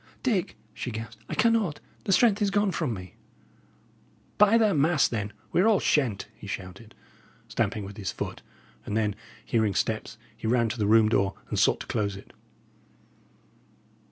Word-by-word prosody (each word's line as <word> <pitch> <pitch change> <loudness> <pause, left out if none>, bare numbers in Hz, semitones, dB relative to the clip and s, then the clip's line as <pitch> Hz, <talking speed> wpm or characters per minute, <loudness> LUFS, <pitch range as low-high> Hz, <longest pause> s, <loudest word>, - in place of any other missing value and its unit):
"Dick," 215 -9 0 0.2
she 125 - -5
gasped, 110 0 -7
"I - - -3
cannot. 225 -9 +2 0.3
The - - 0
strength 215 +1 +4
is 205 - +3
gone 205 0 +2
from 140 -6 -1
me." 90 -4 -7 1.3
"By 210 +2 +7
the 215 -3 +3
mass, 155 0 +3
then, 105 -3 -3 0.2
we - - +3
are 205 - +4
all 215 -4 +4
shent!" 120 -10 +1
he - - -12
shouted, 95 +4 -7 0.5
stamping 105 -2 -1
with 100 +2 -9
his 100 -5 -3
foot; - - -5 0.4
and 105 - -2
then, 105 -2 +1 0.3
hearing 110 -4 +1
steps, - - -1 0.2
he - - -5
ran 115 0 +2
to 120 - -5
the 105 - +1
room 110 0 +6
door 100 -3 +1
and - - -1
sought - - +3
to - - -6
close 100 -2 -1
it. 100 - -13
115 Hz, 170 wpm, -27 LUFS, -, 1.3 s, By